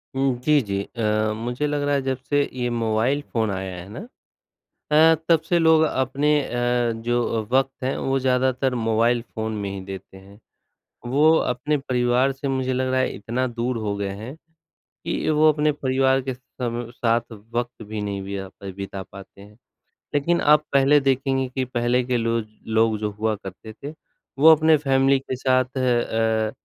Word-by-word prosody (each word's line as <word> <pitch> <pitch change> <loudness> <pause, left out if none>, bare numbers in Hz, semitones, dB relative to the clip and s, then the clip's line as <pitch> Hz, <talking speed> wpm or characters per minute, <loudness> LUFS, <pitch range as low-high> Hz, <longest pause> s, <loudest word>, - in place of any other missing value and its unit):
उम, 135 -1 +1
जी, 150 -2 +4
जी। 100 -3 -3
अ, 110 -2 -1
मुझे 120 +6 -2
लग 145 0 -1
रहा 145 0 +1
है 140 - +1
जब 130 -1 -2
से 145 0 +3
ये 125 -1 -2
मोबाइल 115 +4 0
फ़ोन 110 -3 0
आया 95 -1 -4
है 90 +1 -9
ना 185 - -8 0.8
अ, 160 +2 +6
तब 165 -2 +6
से 175 - +3
लोग 160 -1 +5
अपने 135 0 0
अ, 120 -1 0
जो 120 -2 0
वक़्त 135 0 0
हैं 130 - -1
वो 135 0 0
ज़्यादातर 130 0 +1
मोबाइल 115 +2 +2
फ़ोन 110 -1 -5
में 100 - -3
ही 95 -1 -6
देते 95 0 -9
हैं, 100 +2 -16 0.7
वो 145 +5 +4
अपने 125 +5 0 0.2
परिवार 125 +2 +2
से 135 +1 -5
मुझे 130 -1 -1
लग 130 0 0
रहा 130 - +2
है 130 - +1
इतना 120 +5 -2
दूर 120 +1 -2
हो 100 - -1
गए 100 -1 -2
हैं 130 +6 -7 0.5
कि - - -4
वो 155 0 +5
अपने 150 0 +1
परिवार 135 -1 +1
के 130 - -1
सम 120 -2 -6
साथ 115 0 0 0.2
वक़्त 120 -1 -3
भी 110 0 -4
नहीं 100 -1 -3
बिया 95 -1 -5
बिता 100 0 -6
पाते 100 +1 -14
हैं। 105 +1 -16 0.6
लेकिन 170 +4 +1
आप 150 0 +5
पहले 140 +2 +5
देखेंगे 135 -1 0
कि 130 -1 0
पहले 125 0 0
के 125 0 0
लोग 115 -1 -1 0.3
लोग 110 -1 +3
जो 105 -1 -1
हुआ 110 0 0
करते 100 +2 -10
थे 145 +7 -9 0.5
वो 160 +2 +8
अपने 155 0 +4
फ़ेेमिली 135 -1 +2
के 130 -1 -5
साथ 130 0 0
अ 115 -3 +1
125 Hz, 180 wpm, -23 LUFS, 110-135 Hz, 0.8 s, वो